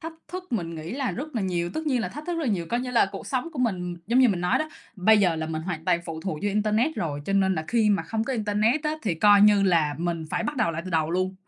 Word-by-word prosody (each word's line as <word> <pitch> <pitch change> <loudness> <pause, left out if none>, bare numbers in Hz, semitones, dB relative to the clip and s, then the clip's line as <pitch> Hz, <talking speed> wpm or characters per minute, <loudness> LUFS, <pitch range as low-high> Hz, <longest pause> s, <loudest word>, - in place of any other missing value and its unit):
Thách 325 -1 -6 0.2
thức 370 -2 -8
mình 170 -7 -2
nghĩ 160 +5 -6
là 265 -1 -1
rất 290 +3 -6
là 220 - -1
nhiều, 175 -2 -1
tất 315 0 -3
nhiên 260 -5 +1
là - - -2
thách 295 +3 -9
thức 350 - -1
rất 325 - -2
là 250 - +1
nhiều. 175 -4 -2
Coi 240 +7 -1
như 250 0 -4
là 235 -5 +3
cuộc - - -7
sống 260 +4 -2
của 295 - -8
mình 180 -8 -1
giống 235 +3 +2
như 255 -2 +6
mình 185 -4 0
nói 180 0 +2
đó, 310 - -2 0.3
bây 215 +3 +5
giờ 175 -4 +2
là 160 0 -3
mình 160 0 -4
hoàn 160 -2 -5
toàn 170 - +2
phụ 160 -1 -6
thuộc 190 -3 -3
vô 205 - +1
internet 215 +8 +1
rồi, 145 -4 -3
cho 195 - -1
nên 190 -1 +3
là 160 -2 -3
khi 225 -3 +3
mà 200 - +2
không 225 0 -2
có 270 - -2
internet 220 +4 +1
á, 305 0 -1
thì 200 -6 0
coi 205 +4 +5
như 205 -1 +6
là 165 -6 +2
mình 170 -1 -2
phải - - -1
bắt 285 +5 -3
đầu 220 -8 +2
lại 165 +1 -4
từ 185 - -6
đầu 160 -2 +1
luôn. 185 +2 -1
205 Hz, 315 wpm, -25 LUFS, 170-245 Hz, 0.3 s, như